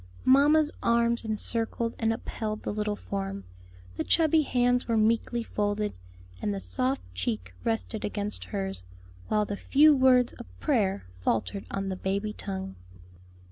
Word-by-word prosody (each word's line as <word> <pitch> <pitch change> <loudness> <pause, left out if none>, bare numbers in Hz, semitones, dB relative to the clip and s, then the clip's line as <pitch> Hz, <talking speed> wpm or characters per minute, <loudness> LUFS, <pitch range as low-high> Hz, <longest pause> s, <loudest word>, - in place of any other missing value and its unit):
Mamma's 295 +3 +5
arms 235 0 +2
encircled 230 +1 +1
and 225 -1 +2
upheld 215 -1 -4
the - - -2
little 210 0 -1
form, 95 - -5 0.5
the - - 0
chubby 320 -1 +4
hands 245 -3 +1
were 230 -1 +1
meekly 230 +2 +1
folded, 210 -1 -1 0.5
and 105 - 0
the 100 - -2
soft 95 +6 -1
cheek 90 0 -3
rested 95 -6 -2
against 100 -2 -2
hers, 95 0 -3 0.5
while 210 -1 +2
the 205 - -4
few 295 +6 +5
words 255 -2 +4
of 240 - -11
prayer 200 - +1
faltered 115 - -1
on 195 0 -3
the 190 - -2
baby 200 +3 -2
tongue. 95 - -5
210 Hz, 140 wpm, -28 LUFS, -, 0.5 s, Mamma's